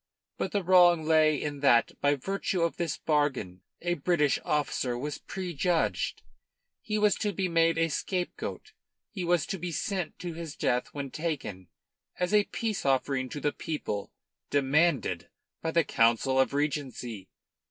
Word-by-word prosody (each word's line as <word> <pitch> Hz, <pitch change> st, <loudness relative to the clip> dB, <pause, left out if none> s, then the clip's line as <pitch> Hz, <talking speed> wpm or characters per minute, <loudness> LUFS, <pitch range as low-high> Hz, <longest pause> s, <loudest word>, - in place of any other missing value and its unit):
But -, -, -3 dB
the 200 Hz, -2 st, 0 dB
wrong 175 Hz, -2 st, +6 dB
lay 155 Hz, -2 st, +4 dB
in 145 Hz, -1 st, -4 dB
that 130 Hz, -4 st, +4 dB
by 145 Hz, 0 st, +3 dB
virtue 185 Hz, +4 st, -1 dB
of 170 Hz, -, 0 dB
this 170 Hz, -4 st, -2 dB
bargain 135 Hz, -, 0 dB, 0.2 s
a 175 Hz, 0 st, +1 dB
British 150 Hz, -2 st, +2 dB
officer 135 Hz, -4 st, 0 dB
was 145 Hz, +4 st, -4 dB
prejudged. 175 Hz, -2 st, -1 dB, 0.6 s
He 215 Hz, -1 st, -2 dB
was 210 Hz, -1 st, +4 dB
to 210 Hz, -, -1 dB
be 190 Hz, 0 st, -1 dB
made 165 Hz, -1 st, +3 dB
a 165 Hz, 0 st, +3 dB
scapegoat. 180 Hz, +3 st, -3 dB, 0.4 s
He 190 Hz, -, -4 dB
was 175 Hz, -2 st, +2 dB
to 195 Hz, -, -4 dB
be 175 Hz, +1 st, -4 dB
sent 185 Hz, 0 st, -3 dB
to 175 Hz, -2 st, -5 dB
his 160 Hz, -2 st, -7 dB
death 125 Hz, -4 st, 0 dB
when 140 Hz, -2 st, -5 dB
taken, 140 Hz, -, -4 dB, 0.5 s
as 180 Hz, +3 st, 0 dB
a 210 Hz, -1 st, +5 dB
peace 220 Hz, -3 st, -3 dB
offering 135 Hz, -1 st, +1 dB
to 145 Hz, -, -5 dB
the 145 Hz, +1 st, 0 dB
people, 125 Hz, -11 st, -4 dB, 0.4 s
demanded 140 Hz, -, +2 dB, 0.3 s
by 165 Hz, -, -1 dB
the 165 Hz, +1 st, +3 dB
Council 120 Hz, +2 st, +2 dB
of 130 Hz, -, +3 dB
Regency. 130 Hz, -8 st, -3 dB
155 Hz, 155 wpm, -29 LUFS, 135-175 Hz, 0.6 s, wrong